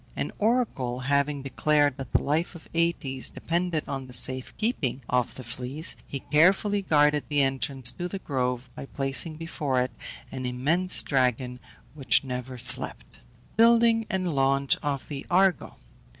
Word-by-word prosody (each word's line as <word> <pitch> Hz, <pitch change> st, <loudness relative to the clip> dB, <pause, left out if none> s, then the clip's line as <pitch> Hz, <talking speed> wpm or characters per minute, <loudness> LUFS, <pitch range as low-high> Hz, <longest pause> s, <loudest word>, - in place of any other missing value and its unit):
An -, -, -3 dB
oracle 205 Hz, -, 0 dB
having 140 Hz, +1 st, 0 dB
declared 145 Hz, 0 st, +1 dB
that 135 Hz, -3 st, -8 dB
the -, -, +1 dB
life 160 Hz, +5 st, -1 dB
of 165 Hz, -, -12 dB
Aëtes 165 Hz, -6 st, -1 dB
depended 170 Hz, -2 st, -2 dB
on 135 Hz, -1 st, -5 dB
the 125 Hz, -, -12 dB
safe 130 Hz, 0 st, +1 dB
keeping 145 Hz, -, 0 dB
of 125 Hz, -1 st, -1 dB
the 130 Hz, -, -9 dB
fleece, 125 Hz, +7 st, 0 dB
he 140 Hz, -, -5 dB
carefully 190 Hz, +6 st, +3 dB
guarded 150 Hz, -5 st, +2 dB
the 145 Hz, -1 st, +2 dB
entrance 135 Hz, -1 st, 0 dB
to 175 Hz, -, -5 dB
the 195 Hz, -, -5 dB
grove 125 Hz, -6 st, -3 dB
by 135 Hz, -, -9 dB
placing 135 Hz, +4 st, +2 dB
before 150 Hz, -5 st, -2 dB
it 125 Hz, 0 st, -1 dB, 0.4 s
an 130 Hz, -1 st, -4 dB
immense 155 Hz, +9 st, +1 dB
dragon, 125 Hz, -2 st, 0 dB, 0.3 s
which 140 Hz, -2 st, +1 dB
never 125 Hz, -1 st, -6 dB
slept. 120 Hz, 0 st, +3 dB, 0.4 s
BUILDING 230 Hz, -1 st, +4 dB
AND 185 Hz, -3 st, -2 dB
LAUNCH 135 Hz, 0 st, +2 dB
OF 140 Hz, -2 st, -4 dB
THE 140 Hz, -2 st, -6 dB
ARGO. 185 Hz, 0 st, +2 dB
140 Hz, 150 wpm, -26 LUFS, 130-170 Hz, 0.4 s, BUILDING